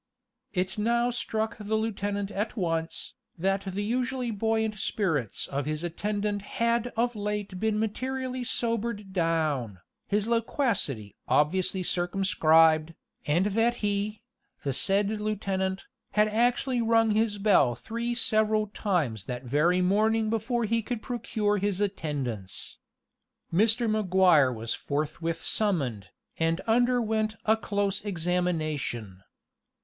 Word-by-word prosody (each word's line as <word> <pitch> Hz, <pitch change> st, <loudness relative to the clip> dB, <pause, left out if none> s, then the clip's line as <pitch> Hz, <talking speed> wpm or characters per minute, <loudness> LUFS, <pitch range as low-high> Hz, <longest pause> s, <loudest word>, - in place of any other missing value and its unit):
It 185 Hz, +2 st, -1 dB
now 235 Hz, +3 st, +2 dB
struck 220 Hz, -2 st, -2 dB
the 210 Hz, +1 st, -1 dB
lieutenant 205 Hz, -2 st, -2 dB
at 210 Hz, +5 st, -3 dB
once, 165 Hz, -3 st, -2 dB, 0.2 s
that 195 Hz, +3 st, +1 dB
the 195 Hz, +1 st, -4 dB
usually 250 Hz, +2 st, -1 dB
buoyant 220 Hz, 0 st, 0 dB
spirits 160 Hz, -, -1 dB
of 140 Hz, 0 st, -3 dB
his 155 Hz, +1 st, -2 dB
attendant 205 Hz, +4 st, -2 dB, 0.2 s
had 235 Hz, 0 st, +2 dB
of 240 Hz, +1 st, +1 dB
late 205 Hz, -2 st, -3 dB
been 220 Hz, 0 st, +1 dB
materially 255 Hz, +3 st, -2 dB
sobered 230 Hz, -4 st, -2 dB
down, 155 Hz, -, 0 dB, 0.3 s
his 205 Hz, 0 st, +1 dB
loquacity 225 Hz, -, -1 dB
obviously 185 Hz, +5 st, +2 dB
circumscribed, 165 Hz, -3 st, +3 dB, 0.3 s
and 170 Hz, +6 st, +3 dB
that 230 Hz, +2 st, +2 dB
he, 205 Hz, +1 st, -1 dB, 0.4 s
the 140 Hz, -, -1 dB
said 200 Hz, +7 st, +4 dB
lieutenant, 190 Hz, -3 st, -2 dB, 0.3 s
had 210 Hz, 0 st, +4 dB
actually 245 Hz, +3 st, +1 dB
rung 225 Hz, -1 st, +3 dB
his 215 Hz, -1 st, +1 dB
bell 195 Hz, -, +4 dB
three 235 Hz, -, -3 dB
several 215 Hz, -2 st, +2 dB
times 165 Hz, -, -1 dB
that 125 Hz, 0 st, -5 dB
very 155 Hz, +8 st, +2 dB
morning 215 Hz, +3 st, +2 dB
before 230 Hz, +2 st, 0 dB
he 230 Hz, +1 st, +1 dB
could 225 Hz, +1 st, -4 dB
procure 215 Hz, -4 st, -1 dB
his 200 Hz, -1 st, 0 dB
attendance. 140 Hz, -, -3 dB, 0.7 s
Mr. 225 Hz, +6 st, +3 dB
Maguire 185 Hz, -9 st, +4 dB
was 115 Hz, -1 st, -3 dB
forthwith 160 Hz, +3 st, -3 dB
summoned, 135 Hz, -, 0 dB, 0.3 s
and 165 Hz, +1 st, +1 dB
underwent 225 Hz, -2 st, +1 dB
a 220 Hz, -, +5 dB
close 200 Hz, -3 st, -1 dB
examination. 160 Hz, -, -2 dB
205 Hz, 120 wpm, -28 LUFS, 165-220 Hz, 0.7 s, a